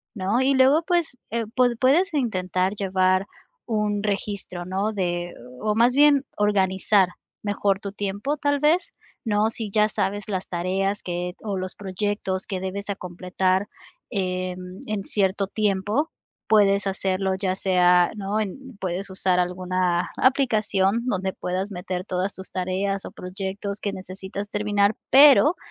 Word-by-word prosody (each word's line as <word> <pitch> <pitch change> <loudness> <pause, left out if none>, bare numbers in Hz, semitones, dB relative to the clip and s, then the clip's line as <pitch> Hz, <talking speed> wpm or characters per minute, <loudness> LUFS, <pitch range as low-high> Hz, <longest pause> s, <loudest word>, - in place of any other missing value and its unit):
¿no? 205 +5 +1
Y 270 +1 +3
luego, 265 +4 +5
pues, 345 -2 +2 0.3
eh, 230 0 -1
pued 245 -2 +3
puedes 315 +9 +3
intentar 185 - 0
llevar 185 -1 +2 0.4
un 210 -2 0
registro, 200 -3 -3
¿no?, 195 +4 -1
de 175 -3 -2 0.3
o, 210 -1 0
más 240 +3 +4
bien, 285 -1 +5
organizar 195 -1 +3 0.3
mejor 205 -1 0
tu 200 -1 -5
tiempo, 205 +8 -2
tal 285 0 +1
vez, 340 - +2 0.3
¿no? 210 0 +2
Si 225 -1 -5
ya 210 +1 +4
sabes 205 0 -2
las 190 -2 -3
tareas 190 +3 -1
que 180 0 -3
o 205 -3 -3
los 185 0 -4
proyectos 190 -1 -2
que 190 - -3
debes, 195 +2 -5
acompletar, 185 0 -1 0.4
em, 185 -2 -3
en 210 -2 -2
cierto 195 0 0
tiempo, 210 - 0 0.4
puedes 200 -2 +4
hacerlo, 190 0 0
ya 190 -1 -1
sea, 180 -2 +4
¿no?, 205 +1 -2
en 255 +5 -5
puedes 190 +1 -3
usar 185 -1 +1
alguna 180 0 0
aplicación 220 -5 +2
donde 190 -6 -1
puedas 185 +2 -3
meter 180 0 -4
todas 185 +1 -2
tus 190 - -9
tareas 190 +2 -2
o - - -7
proyectos 195 +2 -5
que 200 -2 -3
necesitas 190 +2 -7
terminar, 205 0 +1 0.2
pero 290 +4 +8
195 Hz, 140 wpm, -24 LUFS, 185-215 Hz, 0.4 s, pero